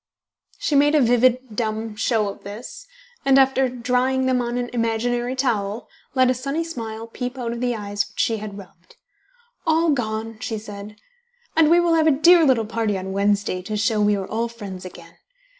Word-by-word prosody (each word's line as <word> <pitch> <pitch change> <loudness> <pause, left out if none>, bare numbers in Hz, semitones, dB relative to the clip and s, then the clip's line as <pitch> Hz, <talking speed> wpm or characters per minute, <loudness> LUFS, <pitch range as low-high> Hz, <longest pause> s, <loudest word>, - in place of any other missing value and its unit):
She - - -2
made 290 +2 +4
a - - +5
vivid 245 -1 +2
dumb 220 -1 -3
show 220 -1 +1
of 200 - -7
this, 250 - -9 0.4
and 270 0 +4
after 265 -1 +4
drying 250 +2 0
them 255 -1 +2
on 240 0 -2
an 245 0 -3
imaginary 240 +2 -1
towel, 220 -5 -1 0.3
let 255 -1 +4
a - - +2
sunny 275 +6 -2
smile 225 -8 -6
peep 250 +2 -6
out 240 -2 -3
of 235 0 -5
the 245 -1 0
eyes 205 -1 -3
which 205 - -14
she 225 - +1
had 210 -1 -7
rubbed. 185 -2 -15 0.7
"All 325 0 +3
gone!" 225 -3 -3
she 225 -2 -3
said; 210 0 -9 0.6
"and 320 -2 +5
we 340 +1 +6
will 345 -1 +2
have 320 -1 +3
a 290 -4 +4
dear 340 +2 +6
little 255 -6 +3
party 220 -2 -1
on 190 0 -5
Wednesday 200 -2 0
to 210 +3 -4
show 215 0 +1
we 205 0 +3
are 195 -1 -3
all 230 +3 -2
friends 200 -6 -9
again. 170 -2 -12
230 Hz, 190 wpm, -22 LUFS, 210-260 Hz, 0.7 s, we